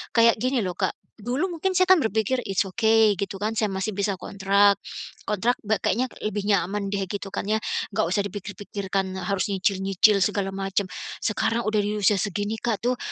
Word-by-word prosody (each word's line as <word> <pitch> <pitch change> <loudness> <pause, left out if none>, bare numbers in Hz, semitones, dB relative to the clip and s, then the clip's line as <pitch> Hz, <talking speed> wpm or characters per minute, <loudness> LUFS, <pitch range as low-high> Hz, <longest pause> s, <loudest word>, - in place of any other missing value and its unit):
kayak 230 0 +6
gini 255 0 +1
loh, 180 - -2
Kak, - - 0 0.2
dulu 245 - -2
mungkin 380 +4 0
saya 370 - +5
kan 375 -3 +6
berpikir, 220 +2 0
"It's 195 +1 0
okay", 220 +2 +4
gitu 195 0 -4
kan, 215 +3 -2
saya 215 -1 +1
masih 195 +2 -2
bisa 200 -1 -1
kontrak, 200 +1 +3 0.4
kontrak 220 +4 +1
be 215 +1 +1
kayaknya 255 +2 0
lebih 210 -1 -2
nyaman 200 0 0
deh, 200 -1 -1
gitu 200 +1 -5
kan, - - -3
ya. 215 - +2 0.4
Enggak - - +1
usah 200 - +2
dipikir-pikirkan, 195 -1 -4
harus 200 0 0
nyicil-nyicil 195 +1 +3
segala 195 -2 -1
macam. 195 +1 -1 0.4
Sekarang 230 +2 0
sudah 215 -1 +1
di 210 +1 -1
usia 200 +1 +4
segini, 205 +3 -2
Kak, 225 -4 -1
tuh, 250 +1 +1
205 Hz, 185 wpm, -25 LUFS, 195-220 Hz, 0.4 s, kayak